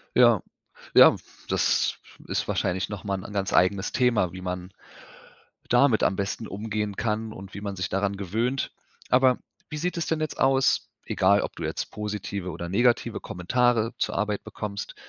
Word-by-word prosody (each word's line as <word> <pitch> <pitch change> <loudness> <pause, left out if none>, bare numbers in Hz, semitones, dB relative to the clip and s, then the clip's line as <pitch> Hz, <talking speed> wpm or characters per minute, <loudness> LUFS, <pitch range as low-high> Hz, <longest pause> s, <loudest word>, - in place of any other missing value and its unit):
Ja, 120 -6 +6 0.5
ja, - - +9 0.3
das - - +2 0.3
ist - - -1
wahrscheinlich 95 +1 -1
noch 105 -4 -6
mal 100 -1 0
'n 95 - -8
an - - -8
ganz 100 -1 -1
eigenes 95 +1 +3
Thema, 115 -9 +2
wie 95 - -7
man 90 0 -5 1.0
damit 120 -2 +4
am 95 - +3
besten 100 +3 -3
umgehen 105 0 -3
kann 110 0 -2
und 95 -1 -10
wie 100 - -7
man 100 -1 -4
sich 95 0 -3
daran 100 +1 0
gewöhnt. 115 +8 -1 0.4
Aber 130 0 +4 0.3
wie 155 - -5
sieht 175 +3 -2
es 170 - -1
denn 160 -1 0
jetzt 155 - -3
aus, 135 0 +3 0.2
egal - - +3
ob - - -5
du - - -5
jetzt - - -3
positive 100 -2 -4
oder 85 +1 -6
negative 120 +5 +2
Kommentare 115 +5 +1
zur - - -1
Arbeit 105 -1 -1
bekommst, 100 -2 -6
105 Hz, 170 wpm, -26 LUFS, 95-120 Hz, 1.0 s, ja